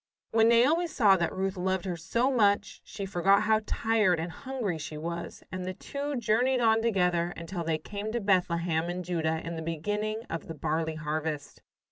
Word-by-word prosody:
When 225 0 +5
Naomi 285 +9 +4
saw 210 -11 +4
that 170 -1 0
Ruth 190 +1 -2
loved 190 0 -1
her 180 -2 -2
so 235 +11 0
much, 205 -5 +2
she 200 -2 -6
forgot 195 +1 +3
how 220 0 +3
tired 215 -6 +2
and 165 +1 -3
hungry 245 - -4
she 155 0 -6
was, 170 +2 -5
and 185 -1 -4
the 185 0 -4
two 285 +6 -4
journeyed 245 +3 +2
on 225 -1 +4
together 180 -6 +1
until 170 +1 -5
they 160 -1 0
came 205 +6 -5
to 240 - 0
Bethlehem 175 -4 +1
in 180 +1 -3
Judah 160 -2 -1
in 165 0 -4
the - - -4
beginning 210 +7 -2
of 165 - -5
the 165 - -6
barley 160 +2 -1
harvest. 155 -1 -4
185 Hz, 185 wpm, -29 LUFS, 165-220 Hz, -, When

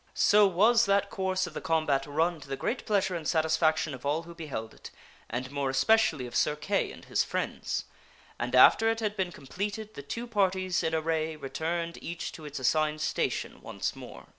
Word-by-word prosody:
So 210 0 +5
was 220 +5 +4
that 200 0 +2
course 185 -1 0
of 175 - -8
the - - -5
combat 155 -4 +1
run 160 +3 0
to 140 - -11
the 135 - -3
great 245 - -3
pleasure 195 -4 +1
and 160 -3 -4
satis 160 -1 +2
faction 155 -2 +1
of 125 - -9
all 150 +4 0
who 170 0 -11
beheld 140 -10 -6
it, - - -11 0.4
and 130 +3 -4
more 140 -1 -1
especially 145 - +3
of 120 - -8
Sir 150 - +2
Kay 195 +7 -1
and - - -12
his - - +1
friends. - - -3 0.5
And - - -1
after 225 0 +7
it 225 0 0
had 210 -2 -1
been 190 -3 -1
completed 205 +8 -5
the - - -7
two 230 - -5
parties 190 -5 +1
in 160 0 0
array 160 0 -1
returned 165 +4 -3
each 170 0 -5
to 155 - -11
its 145 -1 -6
assigned 155 +4 +1
station 155 - -2
once - - -4
more. - - -10
165 Hz, 200 wpm, -29 LUFS, 150-195 Hz, 0.5 s, after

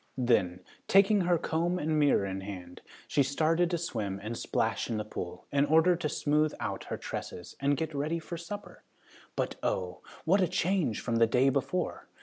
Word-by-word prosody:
Then, 95 -8 +2 0.3
taking 195 +1 +5
her 175 -1 +3
comb 170 +3 0
and 155 -2 0
mirror 145 -9 +4
in 95 0 -4
hand, 90 -3 -8 0.3
she 145 - +2
started 160 +5 +2
to 175 - 0
swim 110 - -3
and 110 +2 -4
splash - - -1
in 115 - -1
the 105 - -3
pool, 90 -3 -6
in 140 0 +3
order 160 +4 +5
to 165 -3 -2
smooth 150 +1 +1
out 100 -4 -4
her - - -4
tresses 90 - -6
and 140 0 +2
get 160 -1 -3
ready 150 +4 -1
for 165 +1 -6
supper. 175 +5 -8 0.5
But - - -2
oh, 90 -1 -2 0.2
what 190 +5 +4
a 185 - +3
change 175 - 0
from 115 -1 -1
the 115 0 +5
day 130 +4 +4
before! 140 +7 -2
145 Hz, 185 wpm, -30 LUFS, 110-170 Hz, 0.5 s, taking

